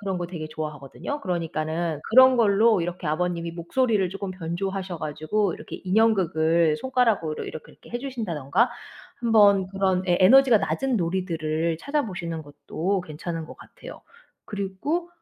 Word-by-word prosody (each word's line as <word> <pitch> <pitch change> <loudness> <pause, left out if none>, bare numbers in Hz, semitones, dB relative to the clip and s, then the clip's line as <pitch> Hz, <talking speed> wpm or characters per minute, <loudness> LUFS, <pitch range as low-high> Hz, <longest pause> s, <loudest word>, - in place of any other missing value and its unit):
그런 195 -3 -3
거 175 - -3
되게 160 -3 -6
좋아하거든요. 155 - -6
그러니까는 165 -2 -2
그런 260 +2 +7
걸로 215 -2 +4
이렇게 175 0 -4
아버님이 170 +1 -1
목소리를 200 +4 0
쪼끔 195 -1 -5
변조하셔 185 +1 -4
가지고 155 +6 -1
이렇게 - - -9
인형극을 170 -6 +2
손가락으로 230 -11 0
이렇게, 155 - -8
이렇게 - - -18
해 240 - -3
주신다든가 225 - -1 0.5
한번 205 -5 +5
그런 190 -1 0
예 175 - +3
에너지가 245 +3 +7
낮은 265 +2 -1
놀이들을 165 -3 -1
찾아보시는 180 - -3
것도 155 +6 -3
괜찮은 165 0 -6
것 - - -11
같아요. - - -12 0.4
그리고 210 - -3
185 Hz, 380 characters per minute, -25 LUFS, 165-220 Hz, 0.5 s, 그런